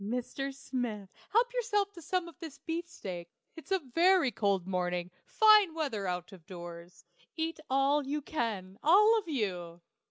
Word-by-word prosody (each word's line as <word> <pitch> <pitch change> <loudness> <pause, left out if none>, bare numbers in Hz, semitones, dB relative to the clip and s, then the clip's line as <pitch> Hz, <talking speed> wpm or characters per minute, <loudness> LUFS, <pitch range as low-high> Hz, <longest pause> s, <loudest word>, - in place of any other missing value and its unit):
Mr. 250 +5 -3
Smith, 245 -7 -4 0.2
help 480 +3 +2
yourself 415 -5 0
to 345 - -12
some 350 +2 -1
of 340 - -12
the 315 -4 -8
beefsteak. 325 - -5 0.3
It's 325 - -12
a 385 - +4 0.2
very 350 -5 +5
cold 200 -4 0
morning 180 -1 -2 0.2
fine 425 -6 +6
weather 230 -12 -2
out 180 +1 -3
of 185 -4 -13
doors. 175 -1 -10 0.3
Eat 325 0 -2
all 275 +2 +2
you 295 +1 -2
can, 210 -10 -3
all 425 +8 +6
of 405 - -11
you. 180 - -3
275 Hz, 155 wpm, -31 LUFS, -, 0.3 s, fine